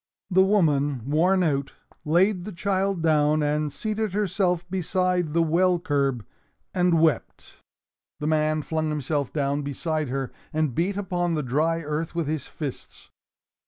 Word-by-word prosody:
The 190 +1 +5
woman, 145 - +2
worn 180 +6 +3
out, 140 -4 -1 0.3
laid 180 +4 +3
the 210 - -6
child 195 -1 -1
down 155 -1 +3
and 150 0 0
seated 215 +4 -3
herself 180 -3 0
beside 180 -2 0
the 165 0 +3
well 175 +3 +3
curb, 140 - -1 0.5
and 180 -2 +3
wept. 160 -2 0 0.6
The 150 - -4
man 155 0 +1
flung 155 0 -1
himself 145 -2 -2
down 140 -1 0
beside 150 +1 -2
her 135 0 -3 0.2
and 155 -4 0
beat 185 +8 0
upon 175 -4 -1
the 150 - -1
dry 155 +6 0
earth 155 +3 -3
with 170 -2 0
his 150 -2 -3
fists. 145 -5 -8
160 Hz, 145 wpm, -25 LUFS, 150-180 Hz, 0.6 s, The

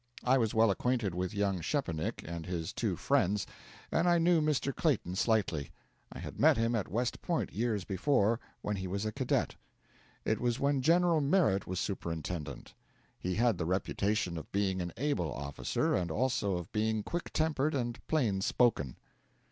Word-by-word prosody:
I 130 +2 +4
was 115 -1 0
well 110 -1 +5
acquainted 120 -2 0
with 90 +1 -2
young 100 -3 0
Szczepanik 85 - -2
and 85 0 -5
his 85 -3 -3
two - - -1
friends, 100 +1 +1 0.5
and 175 - +3
I 175 - +5
knew 170 -1 +4
Mr. 150 -2 0
Clayton 125 - 0
slightly. 95 -9 +1 0.4
I - - -8
had - - -7
met 155 -3 +6
him 115 +1 +1
at 110 -4 0
West 120 +7 -2
Point 170 -2 -1
years 110 -2 0
before, 105 +3 +2 0.2
when 105 -1 -1
he 95 0 -4
was 100 +3 -2
a 110 - -1
cadet. - - 0 0.7
It 110 - 0
was 120 +1 0
when 140 -1 +2
General 170 +2 +4
Merritt 140 - +2
was 95 0 -2
superintendent. 80 -6 -4 0.5
He 90 0 -2
had 115 -4 +2
the 80 - -1
reputation 95 0 0
of - - -12
being 95 -2 0
an 85 0 -3
able 115 - 0
officer, 70 +1 -1
and 90 -2 0
also 110 0 0
of 90 - -7
being 110 0 0
quick 175 +8 -4
tempered 155 -2 +1
and 120 -3 -2
plain 115 -12 +1
spoken. 95 - +1
110 Hz, 170 wpm, -32 LUFS, 90-130 Hz, 0.7 s, met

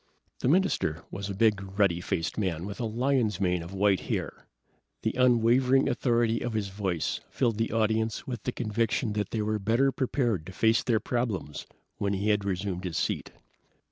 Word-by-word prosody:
The - - -1
minister 140 - +1
was 100 +1 -5
a 100 - -4
big, 105 -1 +3 0.2
ruddy 90 -4 +3
faced 80 -2 -2
man 90 -5 -2
with 100 0 -7
a 120 - -1
lion's 115 -3 +1
mane 90 -3 +1
of 85 +2 -8
white 100 -1 +2
hair. - - -4 0.6
The - - +1
unwavering 125 +1 +4
authority 115 -2 +1
of 120 - -3
his 105 -3 -1
voice 95 -5 -2
filled 115 -4 0
the 115 - 0
audience 110 0 0
with 120 -4 -5
the 125 - -2
conviction 115 0 -1
that 105 -2 -2
they 110 -2 -1
were 110 0 -1
better 115 +7 +2
prepared 120 - -1
to 95 - -8
face 110 +3 +3
their 115 -3 +1
problems 115 - -3 0.3
when 100 0 0
he 100 +2 0
had 105 -1 +2
resumed 95 -1 -2
his 90 -4 -3
seat. - - -2
110 Hz, 180 wpm, -28 LUFS, 95-120 Hz, 0.6 s, unwavering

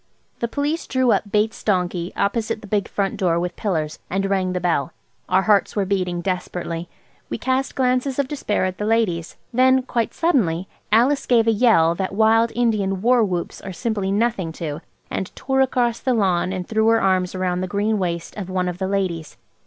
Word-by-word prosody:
The 235 - 0
Police 290 +6 -2
drew 260 -2 +2
up 205 - 0
Bates's 210 +1 +1
donkey 180 -3 0
opposite 215 +1 -1
the 210 - -10
big 205 -1 0
front 200 +2 -2
door 175 -4 +1
with 175 0 -3
pillars, 160 -7 -2
and 195 +1 0
rang 190 -2 0
the 180 - -1
bell. 170 -6 0 0.4
Our 185 +1 +3
hearts 205 -2 +3
were 200 -2 +1
beating 180 -3 -1
desperately. 175 -2 -3 0.4
We - - -3
cast 260 +1 -1
glances 255 +1 +1
of 280 -2 +1
despair 265 -9 -1
at 185 0 -4
the 210 - -1
ladies. 210 -7 0 0.2
Then, 260 +1 +4
quite 235 -3 -2
suddenly, 195 - +1 0.2
Alice 260 +6 +3
gave 235 -3 +4
a 225 - +4
yell 210 -8 +4
that 190 +2 -3
wild 225 +2 +4
Indian 210 -5 0
war 245 0 +4
whoops 180 -4 -3
are 195 - -6
simply 205 -2 -2
nothing 205 -5 0
to, 155 -1 -5 0.3
and 190 - -3
tore 265 0 0
across 245 -3 +1
the 255 -2 0
lawn 185 -4 +1
and 185 -2 -4
threw 220 0 +1
her 225 0 +5
arms 185 -2 +1
round 180 -1 -1
the 185 - -2
green 205 +3 0
waist 170 -2 -3
of 190 -3 -5
one 185 -1 -1
of 180 0 -4
the 190 - -1
ladies. 185 -5 -2
200 Hz, 195 wpm, -22 LUFS, 180-230 Hz, 0.4 s, her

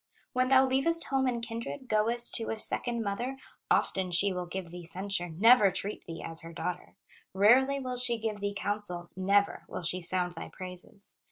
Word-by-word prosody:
When 255 0 +2
thou 265 0 +6
leavest 275 +6 +3
home 270 -1 +1
and 240 -2 -2
kindred 235 +4 -6
Goest 230 +2 0
to 225 - -2
a 225 - -2
second 235 +1 0
mother, 240 +6 -3 0.3
Often 185 -2 +1
she 195 +3 +2
will 180 -1 -4
give 180 -1 -6
thee 175 0 -8
censure, 180 +1 -1
Never 210 +5 +5
treat 200 +3 -5
thee 165 -1 -7
as 165 0 -3
her 165 - -10
daughter, 180 +2 -5 0.4
Rarely 260 +8 +4
will 255 -2 -4
she 245 -1 +2
give 220 -2 -3
thee 205 0 -3
counsel, 200 -5 -1
Never 200 +2 +1
will - - -6
she 180 +2 +2
sound 180 0 +2
thy 165 - -8
praises. 185 +2 -10
205 Hz, 185 wpm, -29 LUFS, 180-240 Hz, 0.4 s, thou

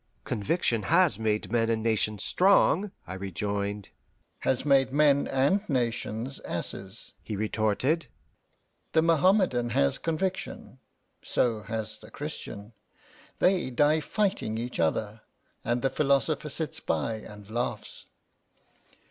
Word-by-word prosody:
"Conviction 115 - 0
has 170 - +3
made 110 -1 -1
men 115 -1 +2
and 110 -1 0
nations 110 -2 +2
strong," 195 +1 +4 0.2
I 95 - -7
rejoined. 100 +2 -3 0.5
"Has 130 +1 0
made 135 -2 +4
men 140 0 +3
and 140 +10 +2
nations 120 -1 -2
asses," 95 +3 -6
he 110 - -5
retorted. 110 +9 0 0.9
"The 160 - +4
Mohammmedan 165 - +3
has 70 0 +2
conviction, 165 -5 -3 0.4
so 115 -3 0
has 110 0 -5
the - - -14
Christian: 105 +3 -7 0.6
they 180 -6 +2
die 145 +5 +3
fighting 185 - -1
each 120 +2 -5
other, 105 +7 -1 0.4
and 120 +2 -1
the 135 - +2
philosopher 145 +1 +1
sits 155 +2 -4
by 115 -1 -1
and 105 -1 -12
laughs. 120 +2 -4
120 Hz, 115 wpm, -28 LUFS, 110-155 Hz, 0.9 s, strong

